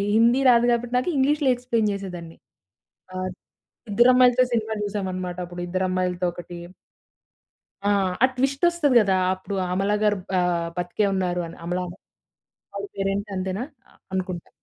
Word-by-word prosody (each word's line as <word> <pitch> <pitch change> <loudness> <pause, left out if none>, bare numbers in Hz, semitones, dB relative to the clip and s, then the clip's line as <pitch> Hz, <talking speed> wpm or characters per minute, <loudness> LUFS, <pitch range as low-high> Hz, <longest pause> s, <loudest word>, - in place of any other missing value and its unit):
హిందీ 235 +3 +5
రాదు 240 0 +5
కాబట్టి, 240 +1 -1
నాకు 255 - 0
ఇంగ్లీష్‌లో 285 +1 +2
ఎక్స్‌ప్లైన్ 235 -3 0
జేసేదాన్ని. 180 -4 -7 0.8
ఆహ్, 185 0 -2 0.6
ఇద్దరు 240 +5 +5
అమ్మాయిలతో 250 0 +5
సినిమా 220 -1 0
చూసామన్నమాట. 185 -3 -3
అప్పుడు 175 0 -8
ఇద్దరు 185 +1 -1
అమ్మాయిలతో 180 -1 -1
ఒకటి 175 0 -9 1.3
ఆ! - - +4 0.3
ఆ - - +10
ట్విస్ట్ 270 +4 -1
వొస్తది 315 -7 +2
గదా! 195 -2 +2 0.2
అప్పుడు 190 +1 -6 0.2
అమల 195 +2 +1
గారు 210 -1 +3 0.2
ఆహ్, 175 -2 +1
బతికే 180 +4 0
ఉన్నారు 180 -2 0
అని 165 - -11
అమలన 180 +1 -2 0.9
ఆవిడ 405 - -4
పేరు 195 0 -1
ఏంటి 205 +1 -4
అంతేనా 190 +4 -2 0.5
అనుకుంటా. 185 -2 -3
195 Hz, 140 wpm, -24 LUFS, 180-240 Hz, 1.3 s, ఆ